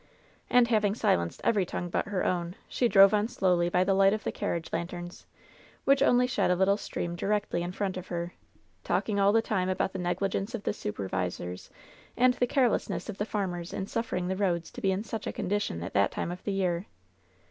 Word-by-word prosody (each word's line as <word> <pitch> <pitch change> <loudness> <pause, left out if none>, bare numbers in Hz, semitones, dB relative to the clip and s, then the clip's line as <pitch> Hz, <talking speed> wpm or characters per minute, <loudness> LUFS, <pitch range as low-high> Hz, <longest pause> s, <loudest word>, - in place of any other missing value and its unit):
And 245 -1 +5
having 210 -3 +2
silenced 85 - 0
every 210 -4 +3
tongue 175 0 -4
but - - -1
her 200 -3 -1
own, 175 0 -1
she 245 - +1
drove 195 -2 +7
on 210 +1 +2
slowly 180 -7 +1
by 180 +1 +3
the 195 +1 +2
light 195 +1 +5
of 215 - -3
the - - -1
carriage 165 -1 -3
lanterns, 175 +1 -5 0.6
which 275 0 +4
only 250 -3 +5
shed 250 - +1
a 180 - +4
little 190 +2 +3
stream 175 -4 -4
directly 200 -1 -1
in 175 +1 -3
front 190 0 -2
of 185 - -7
her, 175 0 -4 0.5
talking 205 -2 0
all 200 0 +5
the 225 +1 +3
time 185 -4 0
about 185 0 -1
the 190 - -4
negligence 195 +5 -1
of 210 - -6
the - - 0
super 105 - -4
visors 90 -1 -4 0.5
and 250 0 +5
the 245 0 0
carelessness 250 -3 0
of 200 - -6
the 205 - 0
farmers 180 -5 -3
in 190 - -3
suffering 230 -4 -2
the 190 - -1
roads 180 -4 -1
to 250 - -9
be 195 -4 +2
in 190 +2 -1
such 225 -1 -5
a - - -1
condition 190 - -2
at 95 - -6
that 100 - +3
time - - -3
of 180 - -8
the 200 - -1
year. 180 -1 -1
190 Hz, 215 wpm, -29 LUFS, 175-210 Hz, 0.6 s, drove